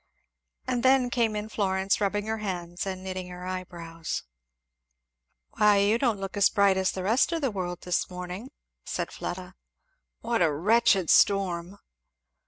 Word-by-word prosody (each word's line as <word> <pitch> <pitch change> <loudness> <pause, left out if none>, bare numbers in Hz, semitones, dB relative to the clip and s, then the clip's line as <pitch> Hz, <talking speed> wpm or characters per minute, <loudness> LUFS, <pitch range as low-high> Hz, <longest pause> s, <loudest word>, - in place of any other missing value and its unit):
And 245 -1 -1
then 260 -1 +4
came 230 -3 +1
in 210 0 -3
Florence, 195 -2 0
rubbing 205 +1 0
her 220 0 -2
hands 180 -3 -4
and 185 -1 -5
knitting 185 -1 -5
her 180 0 -8
eyebrows. 170 -3 -5 1.3
"Why 205 0 +4
don't 235 -3 +1
you - - -11
look 195 +1 -5
as 200 -1 +4
bright 200 -2 +3
as 190 -1 +1
the 185 - -5
rest 225 - +2
of 335 -1 -1
the 270 -4 0
world, 180 -3 -4
this 180 -1 -1
morning," 180 +6 -7 0.3
said - - -4
Fleda. 180 +1 -6 0.7
"What 230 -2 0
a 165 -3 +4
wretched 195 +2 +3
storm!" 190 -2 +2
195 Hz, 155 wpm, -27 LUFS, 180-215 Hz, 1.3 s, then